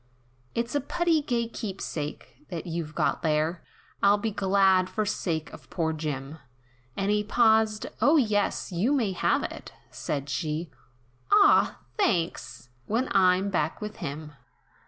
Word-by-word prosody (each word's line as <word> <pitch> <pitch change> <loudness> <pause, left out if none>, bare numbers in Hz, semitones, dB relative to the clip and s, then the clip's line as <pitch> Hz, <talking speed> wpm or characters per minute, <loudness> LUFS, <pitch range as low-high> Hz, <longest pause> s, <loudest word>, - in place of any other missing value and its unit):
"It's 235 +1 -2
a 290 - +1
putty 335 +2 +1
gay 235 -4 -1
keepsake, 160 - -6
that 170 0 -5
you've 165 -2 -4
got - - 0
there, 160 +2 0 0.4
I'd 205 +1 +4
be 225 - 0
glad 190 -2 +3
for 215 - -1
sake 165 -6 -2
of - - -13
poor 160 -2 -1
Jim 150 -1 -5 0.3
" 125 +1 -34
And 195 +1 0
he 210 0 +2
paused, 220 -1 +3 0.2
"O 310 +3 +5
yes 210 -7 +1
you 195 +11 +1
may 235 -8 +1
have 180 - +1
it," - - -7 0.2
said 140 -1 -4
she, 155 +2 -3 0.6
"Ah! 410 -1 +5 0.2
thanks! 165 - -1 0.2
when 235 +5 0
I'm 190 0 +3
back 160 -4 -1
with 210 0 -6
him. 150 +2 -6
190 Hz, 145 wpm, -27 LUFS, 155-220 Hz, 0.6 s, O